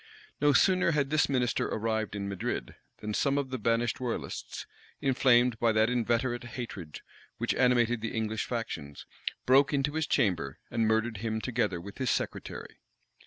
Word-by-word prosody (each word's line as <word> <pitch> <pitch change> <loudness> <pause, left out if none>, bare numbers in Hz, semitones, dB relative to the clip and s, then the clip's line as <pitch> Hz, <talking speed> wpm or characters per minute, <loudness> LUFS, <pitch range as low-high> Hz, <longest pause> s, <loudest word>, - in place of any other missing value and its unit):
No 145 0 +5
sooner 185 +2 +4
had 140 -2 0
this 155 -2 +3
minister 125 -4 +1
arrived 110 -1 -1
in 100 -1 -3
Madrid, 100 - -3 0.3
than 105 0 -3
some 140 +5 +1
of 135 -2 -2
the 130 - -2
banished 115 +1 +1
royalists, 115 - -4 0.3
inflamed 125 -3 +3
by 115 -1 +3
that 110 +2 +3
inveterate 120 +1 0
hatred 110 - -7 0.4
which - - 0
animated 120 -2 +3
the 115 - -3
English 110 -1 -1
factions, 95 - -5 0.4
broke 135 +3 +5
into 140 +1 0
his 160 0 -1
chamber, 85 - +1
and 115 -1 +1
murdered 110 0 +1
him 110 +1 -2
together 110 -7 -1
with 100 +7 -10
his 130 -2 0
secretary. - - -3
115 Hz, 160 wpm, -30 LUFS, 110-130 Hz, 0.4 s, No